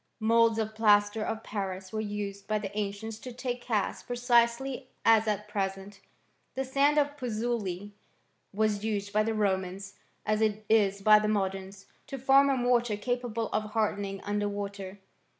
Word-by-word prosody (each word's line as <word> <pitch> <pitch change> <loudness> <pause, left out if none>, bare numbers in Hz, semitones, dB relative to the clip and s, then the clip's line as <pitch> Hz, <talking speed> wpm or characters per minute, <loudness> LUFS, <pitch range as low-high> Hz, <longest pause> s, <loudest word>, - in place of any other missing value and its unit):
Moulds 230 0 +4
of 220 -1 -2
plaster 210 0 +3
of 220 0 -3
Paris 190 -2 -5
were 215 - -1
used 205 -1 -5
by 215 - +1
the 205 -1 -6
ancients 210 +1 -4
to 250 - -8
take 245 0 -4
casts 215 -5 -1
precisely 245 +2 +1 0.2
as 225 -1 +5
at 210 0 -1
present.* 195 -1 -4 0.6
The 265 +1 -1
sand 280 +3 +2
of 290 -1 +2
Puzzoli 220 -6 -3 0.6
was 210 0 0
used 205 -2 -2
by 215 - +4
the 220 +1 -1
Romans, 195 -2 -2 0.3
as 215 0 +1
it 215 -1 0
is 200 -3 +3
by 215 0 +8
the 210 - -1
moderns, 195 -1 -2 0.2
to 275 - -5
form 270 +2 +5
a 270 - +2
mortar 240 -3 +2
capable 235 0 -2
of 215 0 -2
hardening 200 -3 -1
under 205 0 -1
water. 200 -1 -6
215 Hz, 160 wpm, -29 LUFS, 200-235 Hz, 0.6 s, by